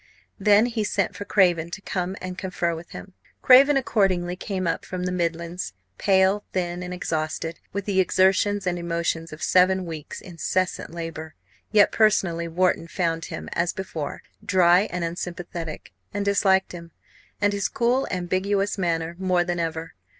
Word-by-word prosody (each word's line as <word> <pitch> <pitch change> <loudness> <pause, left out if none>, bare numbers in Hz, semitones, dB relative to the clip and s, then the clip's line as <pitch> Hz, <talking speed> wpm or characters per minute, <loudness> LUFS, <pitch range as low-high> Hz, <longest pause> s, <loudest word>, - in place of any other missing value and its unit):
Then 205 +2 +5
he 230 -3 -1
sent 200 -2 -1
for 205 - -6
Craven 175 -5 +3
to 175 - -6
come 185 -1 -3
and 185 0 -6
confer 180 -2 -2
with 165 +1 -8
him. 190 - -10 0.3
Craven 275 +3 +7
accordingly 185 -8 +1
came 185 0 -3
up 170 - -1
from 180 0 -5
the 180 - -1
Midlands, 170 0 -3 0.3
pale, 195 +1 +3
thin, 175 -1 -2
and 180 0 -6
exhausted, 165 -2 -3
with 200 0 -4
the 195 -2 +1
exertions 190 +2 +3
and 175 -1 -1
emotions 170 -1 -2
of 155 - -8
seven 185 0 +3
weeks' 160 -3 -7
incessant 185 +1 -2
labour. 165 -1 -7 0.4
Yet 210 -2 +5
personally 185 -6 +2
Wharton 170 0 +1
found 170 -2 -1
him, - - -7
as 170 0 0
before, 165 -6 -5 0.2
dry 180 +1 +4
and 180 -1 -2
unsympathetic; 170 - -5 0.2
and 205 0 -2
disliked 195 -1 +3
him, 170 -1 -9 0.5
and 205 0 +2
his 200 -2 0
cool, 245 +3 +1
ambiguous 195 +3 -1
manner, 165 -2 -1
more 185 -2 +2
than 175 -1 -2
ever. 165 0 -3
180 Hz, 155 wpm, -24 LUFS, 170-195 Hz, 0.5 s, Craven